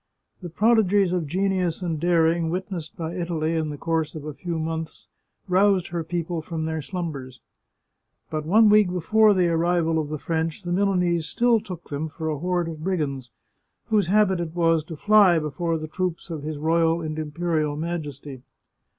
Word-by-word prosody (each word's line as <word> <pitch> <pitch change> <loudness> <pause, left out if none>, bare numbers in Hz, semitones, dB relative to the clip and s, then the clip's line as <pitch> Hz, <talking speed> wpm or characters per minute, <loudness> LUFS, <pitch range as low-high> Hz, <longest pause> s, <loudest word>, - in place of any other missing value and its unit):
The 175 - -6
prodigies 205 -1 +3
of 175 -4 -1
genius 185 +1 -1
and 165 -3 -2
daring 165 0 +2
witnessed 180 -3 -5
by 165 0 -4
Italy 170 -3 -2
in 160 -2 -1
the 145 - -6
course 165 0 -1
of 150 -2 -7
a 150 - -5
few 170 +2 -4
months, 160 0 -4 0.4
roused 190 0 +3
her 170 -1 -3
people 170 0 -3
from 160 0 -4
their 160 0 -2
slumbers. 140 -7 -6 0.9
But 155 -1 -2
one 215 +8 +5
week 210 -2 +5
before 210 +4 +3
the 180 -2 +3
arrival 165 -1 +1
of 150 -2 -3
the 155 - -3
French, 160 +4 -2
the 175 - -4
Milanese 180 -3 +1
still 240 -1 +2
took 185 -5 -9
them 150 +2 -3
for 160 0 -4
a 150 - -3
horde 175 0 -1
of 155 -1 -8
brigands, 145 -9 -2 0.6
whose 210 -5 +2
habit 195 -1 +3
it 170 -1 -4
was 165 -2 +2
to 160 - -7
fly 205 0 +5
before 165 +2 -2
the 155 0 -6
troops 180 +1 -4
of 160 -3 -4
his 155 +1 -5
Royal 165 +2 +2
and 155 -1 -4
Imperial 155 -1 -1
Majesty. 150 -5 -5
165 Hz, 175 wpm, -24 LUFS, 155-180 Hz, 0.9 s, one